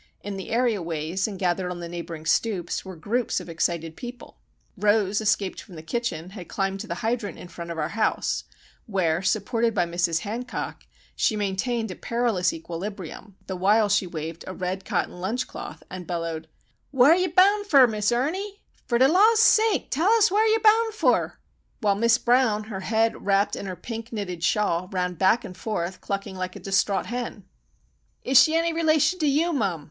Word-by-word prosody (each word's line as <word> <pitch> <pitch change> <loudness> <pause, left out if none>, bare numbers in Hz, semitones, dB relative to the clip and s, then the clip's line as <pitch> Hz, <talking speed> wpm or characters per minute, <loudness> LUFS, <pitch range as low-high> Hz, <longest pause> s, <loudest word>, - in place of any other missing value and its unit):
In 205 0 -5
the 190 - -7
area 230 -4 +1
ways, 165 +3 -2
and 205 -3 -6
gathered 180 0 0
on 180 -1 -5
the 170 - -6
neighbouring 170 -2 -7
stoops, 180 0 0
were 190 -1 -8
groups 225 +9 -1
of - - -10
excited 165 -1 -2
people. 245 0 -10 0.4
Rose, 205 -1 +2
escaped 205 -2 0
from 185 - -14
the 155 - -9
kitchen, 180 -3 -3
had 185 -4 -9
climbed 195 0 -2
the 220 - -4
hydrant 230 -2 -2
in - - -10
front 170 -1 -8
of 170 - -5
our 155 -1 -1
house, 215 +1 0 0.4
where, 175 -5 +1
supported 230 +4 0
by 180 -3 +2
Mrs. 170 -1 0
Hancock, 230 +4 -5 0.3
she 220 - +1
maintained 210 +2 -1
a - - -6
perilous 230 -6 0
equilibrium, 185 +3 -7
the 190 - -4
while 205 +4 +3
she 200 -2 +2
waved 165 0 -6
a 185 - -6
red 185 +1 -4
cotton 180 - -2
lunch 220 +7 -1
cloth - - -9
and 180 -1 -8
bellowed,— 165 -2 -4 0.4
"Whar 270 +3 +6
yer 370 +1 +1
boun' 395 +4 +4
fer, 280 -9 +7
Miss 215 -2 0
Ernie? 375 +12 -2 0.2
Fer 240 - +2
de 260 +2 +6
Law's 425 +8 +5
sake 445 -2 +4
tell 330 +8 +2
us 445 -4 +4
whar 430 +3 +3
yer 445 0 +3
boun' 445 +1 +5
fer?" 435 - +1 0.4
While 210 -4 +2
Miss 230 +3 +3
Brown, 240 -4 +2
her 210 -3 -6
head 225 +3 0
wrapped 200 0 +2
in 200 - -6
her 185 - -4
pink 230 +3 -7
knitted 180 -6 -5
shawl, 180 -2 +1
ran 180 -1 -1
back 190 +7 +2
and 185 - -9
forth, 185 -3 -4
clucking 195 -1 -4
like 185 0 -4
a - - -7
distraught 195 0 +1
hen. 240 -4 -5 0.8
"Is 265 0 +7
she 315 - +3
any 335 0 +1
relation 325 +2 +2
to 310 - +1
you, 315 +5 +2
mum?" 195 - 0
205 Hz, 185 wpm, -25 LUFS, 180-245 Hz, 0.8 s, fer